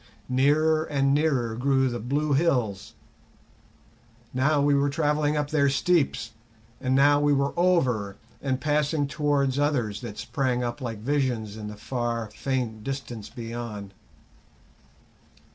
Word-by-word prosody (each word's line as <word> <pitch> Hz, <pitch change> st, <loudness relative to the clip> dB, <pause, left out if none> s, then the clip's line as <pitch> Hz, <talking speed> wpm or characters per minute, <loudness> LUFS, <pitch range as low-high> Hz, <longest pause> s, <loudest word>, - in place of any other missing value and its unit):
Nearer 155 Hz, +5 st, +3 dB
and 140 Hz, -2 st, +1 dB
nearer 135 Hz, -7 st, +1 dB
grew 135 Hz, +2 st, +2 dB
the 120 Hz, -1 st, -3 dB
blue 145 Hz, +6 st, 0 dB
hills; 125 Hz, -, 0 dB, 1.4 s
now 140 Hz, +4 st, +2 dB
we 145 Hz, 0 st, +3 dB
were 140 Hz, 0 st, +2 dB
travelling 150 Hz, 0 st, +1 dB
up 145 Hz, 0 st, -2 dB
their 140 Hz, -3 st, +3 dB
steeps, 140 Hz, -5 st, +1 dB, 0.5 s
and 130 Hz, 0 st, 0 dB
now 145 Hz, +1 st, +5 dB
we 145 Hz, 0 st, +3 dB
were 140 Hz, 0 st, +1 dB
over 130 Hz, -, +1 dB, 0.3 s
and 130 Hz, -2 st, -1 dB
passing 150 Hz, +1 st, +1 dB
towards 140 Hz, -2 st, 0 dB
others 125 Hz, -9 st, 0 dB
that 110 Hz, -4 st, -7 dB
sprang 125 Hz, -3 st, -1 dB
up 120 Hz, +3 st, -4 dB
like 115 Hz, -3 st, -4 dB
visions 120 Hz, -3 st, -1 dB
in 110 Hz, -1 st, -7 dB
the 105 Hz, 0 st, -8 dB
far, 115 Hz, -1 st, -3 dB
faint 120 Hz, -4 st, -3 dB
distance 120 Hz, -5 st, -5 dB
beyond. 115 Hz, -4 st, -6 dB
135 Hz, 130 wpm, -26 LUFS, 120-145 Hz, 1.4 s, now